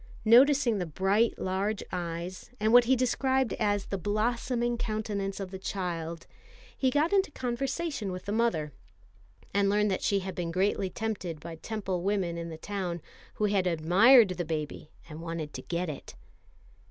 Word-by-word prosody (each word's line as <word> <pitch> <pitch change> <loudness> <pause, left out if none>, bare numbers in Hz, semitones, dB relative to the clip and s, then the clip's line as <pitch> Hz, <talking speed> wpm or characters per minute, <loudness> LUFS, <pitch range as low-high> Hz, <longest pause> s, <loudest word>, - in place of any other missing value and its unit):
Noticing 245 -1 +5
the 180 - -2
bright 195 +8 +1
large 195 +3 -1
eyes, 175 +1 -5
and 215 +2 +2
what 245 0 +8
he 260 +2 +4
described 260 +1 +1
as 205 -2 +1
the 195 - -4
"blossoming 235 +4 0
countenance 210 -4 -3
of 190 -2 -5
the 190 - -6
child," 170 -4 -4 0.5
he 260 - +2
got 300 +7 +1
into 390 -4 +3
conversation 270 - -3
with 180 0 -7
the 200 - -3
mother, 205 - 0 0.8
and 200 0 +3
learned 210 0 +2
that 190 - -1
she 200 -1 +1
had 190 0 -5
been 175 -2 -3
greatly 190 +2 0
tempted 190 -7 -4
by 170 +2 -8
Temple 190 0 -3
women 190 -3 0
in 170 0 -5
the 160 - -7
town, 185 -2 -4 0.4
who 210 - 0
had 200 -3 +1
admired 190 +8 +6
the 180 -1 -2
baby 155 -2 -4 0.2
and 155 0 -9
wanted 165 -2 -5
to - - -6
get 175 +1 -2
it. 150 -3 -7
200 Hz, 165 wpm, -29 LUFS, 175-230 Hz, 0.8 s, what